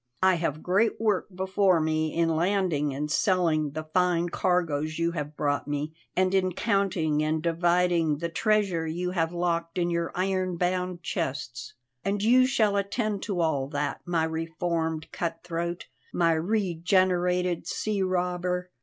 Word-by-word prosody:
I 190 0 +6
have 160 -3 -2
great 200 +5 +2
work 215 -4 +1
before 190 -1 +2
me 155 0 0
in 165 -1 +2
landing 170 -4 +1
and 145 +2 -3
selling 160 -6 +2
the 155 +1 -4
fine 175 +1 +1
cargoes 155 -4 0
you 170 0 +1
have 150 -3 -5
brought 145 -1 0
me, 145 +1 -3 0.2
and 185 +1 +2
in 185 -1 +2
counting 180 -8 +1
and 155 +1 0
dividing 170 -1 +2
the 170 +3 -2
treasure 190 -2 +1
you 175 +3 -2
have 165 -3 0
locked 170 0 -1
in 175 -1 +1
your 170 0 -1
iron 185 -1 0
bound 180 0 -1
chests. 130 -4 -4 0.3
And 200 +1 -1
you 255 +3 +5
shall 215 -6 +2
attend 205 0 -1
to 185 -4 0
all 145 -5 0
that, 145 0 -3
my 170 -2 0
reformed 160 0 -2
cutthroat, 170 +1 -3 0.3
my 170 -1 +2
regenerated 180 -1 +1
sea 210 -2 -1
robber. 180 -1 -1
175 Hz, 145 wpm, -27 LUFS, 160-185 Hz, 0.3 s, I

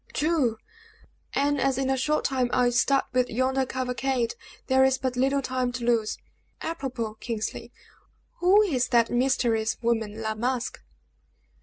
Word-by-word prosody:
"True! 290 -8 +1 0.8
And 285 0 +1
as 270 -1 +1
in 270 -1 0
a - - +2
short 300 +4 0
time 255 -2 +1
I 250 -1 +3
start 270 +3 +2
with 250 -1 +2
yonder 260 +2 0
cavalcade, 255 -1 -1 0.3
there 265 0 +4
is 265 0 +3
but 260 -1 -2
little 270 +2 +1
time 255 -1 -1
to 245 -1 -4
lose. 230 -3 +1 0.4
Apropos, 260 -9 -4
Kingsley, 225 -3 -4 0.7
who 390 +4 +5
is 265 -11 0
that 235 -2 +3
mysterious 240 -3 +1
woman, 225 -2 -1
La 220 -1 -2
Masque?" 245 +2 -2
255 Hz, 145 wpm, -26 LUFS, 235-270 Hz, 0.8 s, who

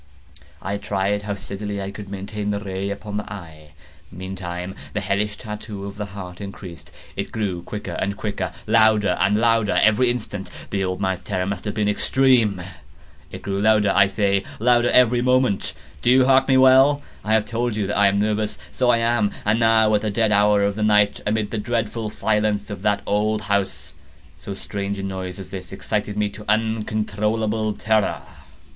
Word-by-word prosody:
I 100 +1 -2
tried 100 0 -1
how 105 -1 -3
steadily 100 +1 -5
I 100 0 -4
could 100 -1 -9
maintain 100 +1 -4
the 100 0 -1
ray 100 -1 -4
upon 105 +1 -5
the 105 - -5
eve. 80 -6 -10 0.4
Meantime 90 0 -6 0.2
the 105 - -1
hellish 100 +1 -1
tattoo 105 -2 -7
of 100 0 -8
the 105 -1 -4
heart 90 -1 -9
increased. 95 -3 -9 0.2
It - - -4
grew 100 -6 -2
quicker 105 +4 -6
and 100 +1 -2
quicker, 105 -2 -3
and - - -3
louder 110 -2 +5
and 100 +2 +3
louder 115 -2 +2
every 110 +4 +4
instant. 105 -5 -4 0.2
The 100 -1 0
old 95 0 -2
man's 95 -1 -1
terror 95 -1 -2
must 100 0 -4
have 105 - -3
been 105 -1 +1
extreme! 110 -3 +2 0.7
It - - -9
grew 100 0 -2
louder, 105 -1 +4
I 100 -1 +6
say, 100 0 +1
louder 120 +1 +3
every 125 -1 +4
moment!—do 125 -2 0
you 130 +1 +6
mark 135 0 +4
me 135 -1 +4
well? 130 +2 +6 0.2
I 110 - 0
have 110 -1 +3
told 120 -1 -2
you 105 -2 -1
that 100 - -2
I 100 - +6
am 100 0 +2
nervous: 105 -3 0
so 100 - +1
I 120 - +5
am. 115 -2 +2 0.2
And 105 +2 +2
now 110 -1 +4
at 105 - +3
the 110 - -1
dead 110 +1 +1
hour 105 0 +4
of 100 0 +1
the 110 - -4
night, 105 -1 +3
amid 105 0 0
the 115 - -2
dreadful 115 0 -2
silence 105 -1 0
of 100 - -6
that 105 0 +1
old 105 +1 0
house, 100 -1 -2 0.5
so 100 - -6
strange 100 0 -4
a 95 - -5
noise 95 -2 -5
as 95 -2 -10
this 90 -3 -7
excited 105 +1 -3
me 105 -1 +1
to 105 +1 -11
uncontrollable 110 0 -1
terror. 110 0 0
105 Hz, 190 wpm, -22 LUFS, 100-110 Hz, 0.7 s, I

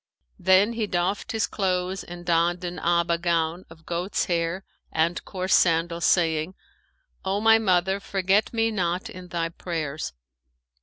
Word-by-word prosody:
Then 190 +5 +4
he 225 -2 -2
doffed 180 +2 -1
his 220 -1 +1
clothes 185 -1 -1
and 175 0 -10
donned 175 +1 +1
an 180 0 -4
Aba 170 0 +1
gown 170 0 0
of 160 0 -16
goat's 175 +3 -1
hair 170 +2 -1 0.3
and 165 +2 0
coarse 185 0 -2
sandals, 170 0 +3
saying, 165 0 +2 0.7
'O 195 +1 0
my 225 +1 +6
mother, 190 -1 +2
forget 195 +1 +1
me 225 -1 +1
not 185 +2 -2
in 185 -4 -10
thy 170 -1 -2
prayers.' 160 -3 -4
180 Hz, 145 wpm, -25 LUFS, 170-190 Hz, 0.7 s, my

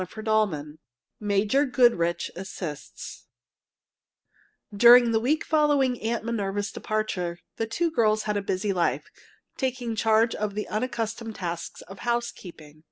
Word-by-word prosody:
CHAPTER 215 +4 -9
XVII 165 -9 0 0.4
MAJOR 210 +7 +2
GOODRICH 175 -10 +2
ASSISTS 170 -5 -7 1.5
During 240 +2 +8
the 225 - +3
week 280 +7 0
following 290 -5 +2
Aunt 225 +1 -1
Minerva's 205 -3 -2
departure, 190 -6 -2 0.2
the 225 - -1
two 330 +9 -1
girls 215 -6 +2
had 210 -1 -1
a 205 - 0
busy 195 +1 -1
life, 175 -2 0 0.5
taking 250 -3 -2
charge 220 +1 +3
of 210 -1 -3
the 210 - -3
unaccustomed 225 -1 -3
tasks 170 -2 -5
of 195 - -12
housekeeping. 195 -11 -4
215 Hz, 125 wpm, -26 LUFS, 195-235 Hz, 1.5 s, During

